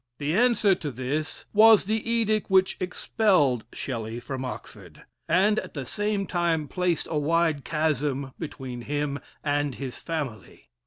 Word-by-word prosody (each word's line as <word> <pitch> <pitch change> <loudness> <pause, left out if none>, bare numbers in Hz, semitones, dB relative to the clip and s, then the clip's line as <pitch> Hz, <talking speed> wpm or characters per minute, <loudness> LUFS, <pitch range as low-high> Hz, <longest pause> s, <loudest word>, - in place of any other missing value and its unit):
The 150 +2 -1
answer 225 -3 +4
to 165 -5 -4
this 140 +5 -3
was 220 -1 +7
the 220 +2 -1
edict 220 -2 +1
which 190 0 +4
expelled 180 - +1
Shelley 115 -3 -4
from 130 +1 -5
Oxford, 130 - -8 0.3
and 210 +3 +4
at - - -9
the 135 -3 -4
same 205 - -1
time 170 -4 0
placed 180 +1 -1
a 155 - +1
wide 160 -1 +1
chasm 145 -4 -1
between 130 -6 -6
him 145 +2 -2 0.2
and 145 -2 0
his 135 -3 -6
family. 145 - -6
155 Hz, 145 wpm, -26 LUFS, 135-190 Hz, 0.3 s, was